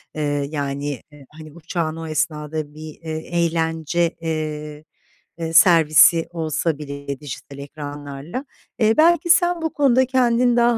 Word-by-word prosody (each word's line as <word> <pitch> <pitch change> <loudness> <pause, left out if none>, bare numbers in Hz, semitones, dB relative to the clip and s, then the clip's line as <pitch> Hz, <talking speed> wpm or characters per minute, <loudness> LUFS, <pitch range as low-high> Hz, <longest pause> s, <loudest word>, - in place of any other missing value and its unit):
Eee, 155 - -3 0.3
yani, 145 -1 -3 0.2
e, 145 -2 -15
hani, 155 0 -12
uçağın 165 -1 -3
o 165 0 -7
esnada 155 -1 -3
bir, 155 0 -9
eee, 160 -1 -4 0.3
eğlence, 165 +1 0
eee, 155 -2 -4 0.5
eee, 165 -1 -4
servisi 165 -1 +6
olsa 160 -1 -1
bile 140 -2 -6
dijital 140 -1 -9
ekranlarla, 145 - -7 0.3
eee, 220 -1 +4
belki 340 +1 +4
sen 350 -1 +4
bu 320 - -2
konuda 260 -3 +3
kendin 245 -1 +2
daha 235 0 +3
160 Hz, 135 wpm, -21 LUFS, 150-180 Hz, 0.5 s, servisi